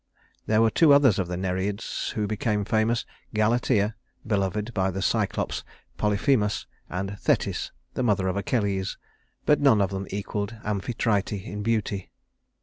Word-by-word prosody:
There 110 +1 +4
were 110 - +4
two 155 -4 +6
others 135 -8 +5
of 95 - 0
the 90 0 -3
Nereids 95 +3 -2
who 105 - 0
became 105 0 -1
famous: 110 +2 +1 0.3
Galatea, 110 -1 +2 0.3
beloved 105 +1 -1
by 95 -2 +1
the 95 +1 -3
Cyclops - - 0 0.4
Polyphemus, 105 +1 +2 0.2
and 95 +2 -4
Thetis, - - 0 0.2
the - - -2
mother 105 -6 +2
of 95 - 0
Achilles; 100 -2 -1 0.5
but 150 -1 +4
none 135 -7 +5
of 100 -1 +1
them 95 0 -4
equaled 100 +2 -3
Amphitrite 105 0 0
in 105 +1 -5
beauty. 105 -3 -1
105 Hz, 145 wpm, -26 LUFS, 100-110 Hz, 0.5 s, two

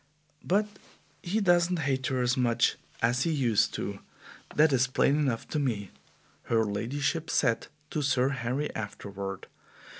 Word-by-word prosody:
"But 205 +4 +2 0.6
he 190 +5 -1
doesn't 175 -1 +3
hate 135 -4 0
her 130 -1 0
as 125 +1 +2
much 120 -2 +2 0.3
as 120 +2 +3
he 165 - +1
used 125 -8 +2
to, - - -4 0.6
that 150 -1 +5
is 130 0 +3
plain 135 +2 +2
enough 130 -6 -1
to 155 - -1
me," 110 -9 -2 0.5
her 115 -1 +2
ladyship 135 +10 -2
said 115 -1 +1 0.2
to 155 - -1
Sir 135 -2 +2
Harry 135 +2 -2
afterward. 100 -2 -6
130 Hz, 145 wpm, -29 LUFS, 115-150 Hz, 0.6 s, that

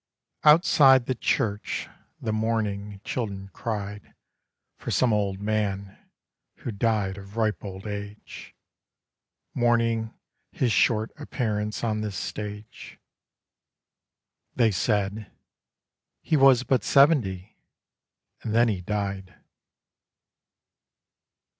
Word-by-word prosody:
OUTSIDE 145 -5 +6
the 130 - 0
church 105 -3 -1 0.3
the 110 - -2
mourning 105 -2 -2
children 100 -5 -4
cried 105 -3 -5 0.6
For - - -7
some 125 -3 +2
old 100 -2 0
man 100 -2 -2 0.6
who 120 - -6
died 100 -2 0
of 100 +2 -12
ripe 110 -2 0
old 95 0 -8
age, 105 0 -8 1.0
Mourning 115 -2 +1 0.4
his 125 -3 0
short 110 +1 +2
appearance 105 -8 -3
on 110 -2 0
this 105 -2 -4
stage. 105 +4 -7 1.6
They 115 -3 +3
said: 105 +1 -1 0.5
' - - -62
He 160 - +1
was 135 -3 +6
but 130 -1 +1
seventy, 115 - +3 0.8
and 110 - -3
then 120 0 +5
he 95 -4 -2
died.' 100 -1 -4
105 Hz, 95 wpm, -26 LUFS, 100-115 Hz, 1.6 s, OUTSIDE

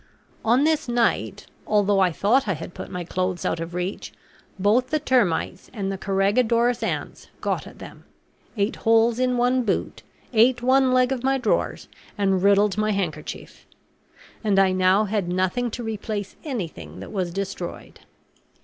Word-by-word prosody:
On 240 +5 +3
this 315 -1 +1
night, 240 -1 0 0.2
although 205 -1 +3
I 185 -2 +4
thought 220 +10 +2
I 195 - +1
had 165 +3 -8
put - - -8
my 180 -1 -4
clothes 185 +1 -2
out - - -1
of 165 +1 -6
reach, 180 +2 -4 0.5
both 210 +6 +2
the 310 - 0
termites 205 - 0
and 195 -4 -3
the 195 - -4
carregadores 230 +5 +2
ants - - -4
got - - -2
at - - -13
them, - - -12 0.5
ate 200 +1 0
holes 225 +1 +3
in 250 -1 +1
one 250 +1 +2
boot, 215 -5 -2 0.3
ate 240 +2 +4
one 260 +1 +4
leg 255 0 +3
of 260 -2 -2
my 270 +1 +2
drawers, 260 - -1 0.3
and 195 -2 +1
riddled 200 +1 +3
my 215 0 +1
handkerchief; 165 -6 -5 0.8
and 205 -3 +2
I 195 -1 +5
now 185 +2 +3
had 200 -3 -1
nothing 185 +7 0
to 240 +2 -6
replace 215 -2 -4
anything 165 - -6
that 95 - -9
was 185 -3 -2
destroyed. 190 -1 -6
205 Hz, 160 wpm, -24 LUFS, 185-245 Hz, 0.8 s, I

